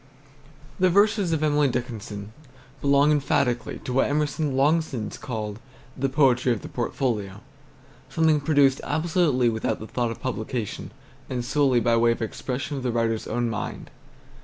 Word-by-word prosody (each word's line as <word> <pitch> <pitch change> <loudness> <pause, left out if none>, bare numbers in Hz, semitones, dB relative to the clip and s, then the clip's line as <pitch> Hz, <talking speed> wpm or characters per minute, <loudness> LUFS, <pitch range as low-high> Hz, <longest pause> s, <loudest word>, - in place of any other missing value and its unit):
THE 185 0 +4
verses 200 -1 +3
of 155 -1 0
Emily 150 -1 +3
Dickinson 110 -4 -5 0.5
belong 140 +1 +4
emphatically 135 -4 0
to 125 - -4
what 135 - +2
Emerson 145 -1 0
long 150 +5 +4
since 120 -9 -5
called 110 -3 -5 0.4
"the 135 +1 -1
Poetry 130 -3 +3
of 115 - -2
the - - -7
Portfolio," 110 -6 -2 0.7
something 160 -2 +2
produced 140 -3 +3
absolutely 155 -4 +1
without 110 -1 0
the 110 - -7
thought 120 +1 -1
of 115 - -6
publication, 120 -3 -4 0.4
and 125 -2 -3
solely 135 -2 +3
by 115 +1 +3
way 115 0 +4
of - - -9
expression 130 +5 -4
of - - -4
the 125 -1 -1
writer's 115 -1 -1
own 120 0 -1
mind. 110 -1 -5
130 Hz, 155 wpm, -25 LUFS, 115-145 Hz, 0.7 s, THE